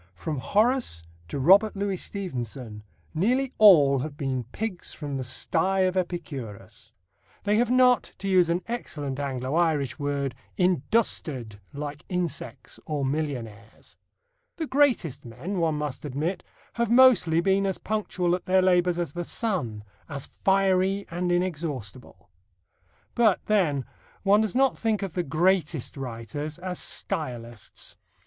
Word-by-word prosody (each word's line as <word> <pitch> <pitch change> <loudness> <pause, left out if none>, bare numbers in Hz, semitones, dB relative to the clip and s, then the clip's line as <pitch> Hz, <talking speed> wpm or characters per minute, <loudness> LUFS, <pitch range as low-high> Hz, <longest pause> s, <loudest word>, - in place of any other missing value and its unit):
From 150 - -4
Horace 215 - +1 0.2
to - - -4
Robert 195 +10 +5
Louis 200 -1 -1
Stevenson, 125 - -5 0.3
nearly 250 +11 +1
all 150 -10 +7
have 145 +2 -5
been 130 -4 -2
pigs 185 - -5
from 145 -2 -5
the 135 - -2
sty 175 +9 +1
of 185 0 +2
Epicurus. 160 - -5 0.5
They 210 +1 +2
have 240 0 +2
not, 250 -2 +4
to 195 - -5
use 185 -3 +4
an 175 +2 0
excellent 145 - -4
Anglo 130 -1 -3
Irish 160 -5 +1
word, 140 -2 -1 0.2
"industered" 155 - 0
like 145 +1 -6
insects 175 -5 -4
or 145 -3 -1
millionaires. 125 -8 -5 0.6
The 325 - -3
greatest 265 - +2
men, 130 - -5
one 160 -2 +1
must 150 -3 -4
admit, 155 +6 -3 0.3
have 235 -2 0
mostly 235 -10 +6
been 195 +2 +2
as 190 - -1
punctual 190 -5 -1
at 180 - -2
their 185 0 +4
labours 180 -1 +3
as 175 -2 -2
the 175 0 -3
sun 160 - -2 0.3
as 140 -2 -5
fiery 195 0 +1
and 175 +1 -1
inexhaustible. 140 - -3 0.8
But, 225 -5 +3
then, 160 - +1 0.4
one 205 +2 +5
does 215 -1 -1
not 270 0 +3
think 220 -3 0
of 190 -4 -4
the 180 - 0
greatest 165 -2 0
writers 135 +4 -5
as 180 0 -5
stylists. 120 - -5
170 Hz, 135 wpm, -26 LUFS, 140-195 Hz, 0.8 s, all